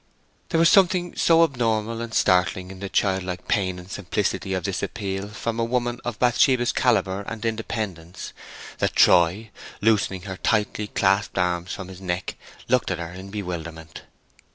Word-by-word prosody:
_" -, -, -39 dB
There 165 Hz, -, +1 dB
was 165 Hz, -, +6 dB
something 180 Hz, -1 st, +4 dB
so 165 Hz, 0 st, +5 dB
abnormal 115 Hz, -5 st, 0 dB
and 115 Hz, -1 st, -5 dB
startling 90 Hz, -2 st, +2 dB
in 95 Hz, -, -10 dB
the 100 Hz, 0 st, -5 dB
childlike 95 Hz, -3 st, -1 dB
pain 95 Hz, -3 st, 0 dB
and 90 Hz, 0 st, -10 dB
simplicity 95 Hz, 0 st, -2 dB
of 95 Hz, -, -3 dB
this 100 Hz, -1 st, -2 dB
appeal 100 Hz, -2 st, -3 dB
from 115 Hz, +2 st, -4 dB
a -, -, +2 dB
woman 120 Hz, 0 st, -1 dB
of 120 Hz, -2 st, -4 dB
Bathsheba's 120 Hz, 0 st, +3 dB
calibre 100 Hz, -5 st, +1 dB
and 115 Hz, 0 st, -5 dB
independence, 105 Hz, -6 st, -4 dB, 0.5 s
that -, -, 0 dB
Troy, 95 Hz, +6 st, +4 dB, 0.3 s
loosening 100 Hz, -4 st, +1 dB
her 95 Hz, -1 st, -6 dB
tightly 105 Hz, 0 st, 0 dB
clasped 100 Hz, 0 st, +1 dB
arms 90 Hz, -1 st, 0 dB
from 95 Hz, -, -6 dB
his 95 Hz, 0 st, -11 dB
neck, 90 Hz, 0 st, -3 dB, 0.3 s
looked 125 Hz, 0 st, +2 dB
at 90 Hz, -, -1 dB
her 85 Hz, +1 st, -6 dB
in 95 Hz, +2 st, -9 dB
bewilderment. 85 Hz, -5 st, -6 dB
100 Hz, 165 wpm, -24 LUFS, 90-115 Hz, 0.5 s, was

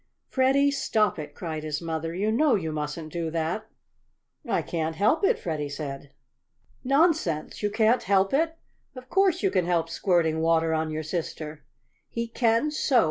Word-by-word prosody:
"Freddie, 275 Hz, +2 st, +3 dB
stop 220 Hz, -, +1 dB
it!" 150 Hz, -, -7 dB
cried 160 Hz, -3 st, -4 dB
his 150 Hz, -1 st, -3 dB
mother. 165 Hz, 0 st, -3 dB
"You 205 Hz, +4 st, 0 dB
know 280 Hz, +4 st, +3 dB
you 160 Hz, -6 st, -2 dB
mustn't 155 Hz, +1 st, -5 dB
do 170 Hz, -2 st, -2 dB
that!" 165 Hz, +6 st, -2 dB, 0.8 s
"I -, -, +1 dB
can't 160 Hz, -1 st, -2 dB
help 215 Hz, -, +2 dB
it," 445 Hz, +3 st, +4 dB
Freddie 150 Hz, -4 st, -3 dB
said. 140 Hz, -1 st, -6 dB, 0.7 s
"Nonsense! 275 Hz, -, +1 dB
You 210 Hz, -, +1 dB
can't 220 Hz, +3 st, +3 dB
help 195 Hz, +1 st, +2 dB
it? 325 Hz, +3 st, +1 dB, 0.4 s
Of 255 Hz, 0 st, -11 dB
course 380 Hz, -2 st, +3 dB
you 390 Hz, -, +3 dB
can 180 Hz, -2 st, +1 dB
help 165 Hz, -2 st, +1 dB
squirting 170 Hz, -4 st, +1 dB
water 165 Hz, 0 st, +2 dB
on 160 Hz, 0 st, 0 dB
your 155 Hz, 0 st, -3 dB
sister!" 155 Hz, -2 st, -5 dB, 0.4 s
"He 235 Hz, 0 st, -3 dB
can 230 Hz, +4 st, +1 dB
so!" 280 Hz, -4 st, +3 dB
175 Hz, 165 wpm, -26 LUFS, 160-255 Hz, 0.8 s, it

